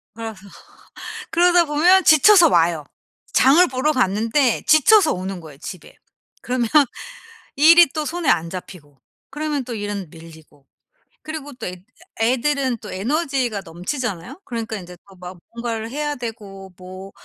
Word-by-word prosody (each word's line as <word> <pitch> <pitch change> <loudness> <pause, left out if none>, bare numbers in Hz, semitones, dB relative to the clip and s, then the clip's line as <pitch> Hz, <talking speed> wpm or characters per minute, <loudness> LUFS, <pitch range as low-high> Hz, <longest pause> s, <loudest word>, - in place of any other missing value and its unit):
그래서 225 -1 -7 1.0
그러다 350 0 +4
보면 345 +6 +3
지쳐서 335 +3 +6
와요. 165 - +1 0.5
장을 300 +8 +5
보러 260 +4 0
갔는데 230 +1 0
지쳐서 310 +4 +5
오는 185 0 -5
거예요 155 -4 -13
집에. 170 +3 -10 0.5
그러면 245 -2 -2 0.9
일이 335 +4 +7
또 310 -1 -3
손에 340 -1 -4
안 165 +1 +1
잡히고 165 -6 -10 0.3
그러면 295 -1 -3
또 240 -1 -6
일은 205 -4 -5
밀리고. 160 -4 -16 0.6
그리고 310 -2 -7
또 240 -2 -8
애 180 -1 -8 0.4
애들은 260 +2 0
또 210 -2 -10
에너지가 255 - -2
넘치잖아요. 195 - -6
그러니까 230 -4 -5
인제 180 -2 -10
또 195 - -17
막 180 0 -10 0.2
뭔가를 230 -1 -5
해야 295 +1 -3
되고 205 -5 -9
뭐 185 +1 -11
235 Hz, 295 characters per minute, -20 LUFS, 185-295 Hz, 1.0 s, 일이